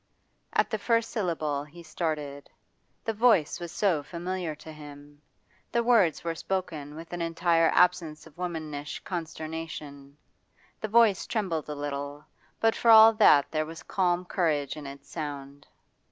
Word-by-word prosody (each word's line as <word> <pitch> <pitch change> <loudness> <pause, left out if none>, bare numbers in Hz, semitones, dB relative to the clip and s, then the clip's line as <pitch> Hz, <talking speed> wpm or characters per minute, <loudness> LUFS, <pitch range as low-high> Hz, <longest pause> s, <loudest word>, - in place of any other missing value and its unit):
At - - +2
the 220 - -1
first 230 +1 +1
syllable 155 - -1
he 165 +4 -13
started; 150 -3 -4 0.6
the 225 - 0
voice 220 -8 +3
was 170 -1 -6
so 185 -8 +1
familiar 175 +1 -4
to 155 +1 -11
him. 145 -1 -12 0.5
The 235 - +1
words 225 -10 +3
were 165 -1 -1
spoken 160 -5 -4
with 165 +2 -10
an 175 - -3
entire 165 0 +2
absence 175 -4 +2
of 150 - -16
womanish 155 -4 -5
consternation; 155 -4 -6 0.6
the 215 - -3
voice 220 -3 +4
trembled 180 -9 -2
a 150 - -4
little, 145 0 -5 0.3
but 225 0 +3
for 235 - +1
all 225 0 +9
that 150 -10 +5
there 155 -1 -1
was 160 0 -9
calm 180 -1 0
courage 155 -7 0
in 150 -2 -8
its 140 0 -11
sound. 145 -2 -7
160 Hz, 150 wpm, -28 LUFS, 145-180 Hz, 0.6 s, all